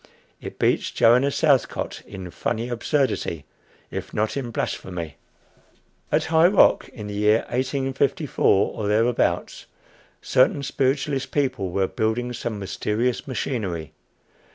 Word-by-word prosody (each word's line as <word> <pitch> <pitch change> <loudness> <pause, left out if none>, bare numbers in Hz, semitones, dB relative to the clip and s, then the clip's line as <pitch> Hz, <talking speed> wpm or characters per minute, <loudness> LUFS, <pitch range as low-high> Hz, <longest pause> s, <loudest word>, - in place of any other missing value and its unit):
It - - -8
beats - - +1
Joanna 125 +4 +4
Southcott 140 -3 +1
in 95 -3 -8
funny 115 +6 -2
absurdity, 120 - -1 0.5
if - - -6
not 110 +1 0
in 135 -4 -3
blasphemy. 85 -8 -4 0.9
At - - +2
High 160 +1 +5
Rock, 195 +2 +4
in 105 -4 -9
the 105 - -6
year 105 +2 +3
1854 135 - +1
or 105 - -3
thereabouts, 115 +3 0 0.5
certain 140 +2 +2
spiritualist 135 +1 0
people 130 -9 -1
were 95 +2 +1
building 115 +5 -1
some 120 -2 -4
mysterious 105 +6 -2
machinery. 100 - -3
120 Hz, 115 wpm, -23 LUFS, 105-135 Hz, 0.9 s, High